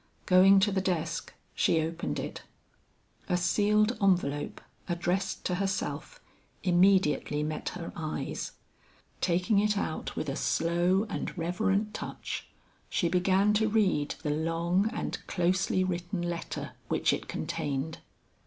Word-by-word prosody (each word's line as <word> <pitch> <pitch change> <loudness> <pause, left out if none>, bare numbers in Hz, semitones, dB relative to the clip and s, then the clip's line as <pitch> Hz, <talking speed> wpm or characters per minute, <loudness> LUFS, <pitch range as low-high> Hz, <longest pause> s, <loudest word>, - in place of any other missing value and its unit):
Going 190 +2 +7
to 205 +1 +3
the 190 -1 +1
desk, 165 -3 -2 0.2
she 165 - +2
opened 165 +2 -2
it. - - -5 0.9
A 180 - +3
sealed 210 +5 +2
envelope 175 -7 +1 0.3
addressed 175 +2 -1
to 180 - 0
herself, 195 - -3 0.4
immediately 180 -5 +3
met 155 0 -3
her 170 - -6
eyes. 155 -2 -4 0.7
Taking 180 +4 +2
it 210 0 +2
out 160 - -3
with 155 - -3
a 135 - -2
slow 175 +6 +2
and 200 - -4
reverent 195 +5 0
touch, - - -5 0.4
she 170 - +1
began 190 +3 +3
to 220 +1 +2
read 195 -9 +1
the 150 - 0
long 165 +6 +1
and - - -3
closely 185 +1 +1
written 175 0 -2
letter 175 -1 -4 0.2
which - - +2
it - - -4
contained. 145 +2 -3
180 Hz, 125 wpm, -29 LUFS, 165-195 Hz, 0.9 s, Going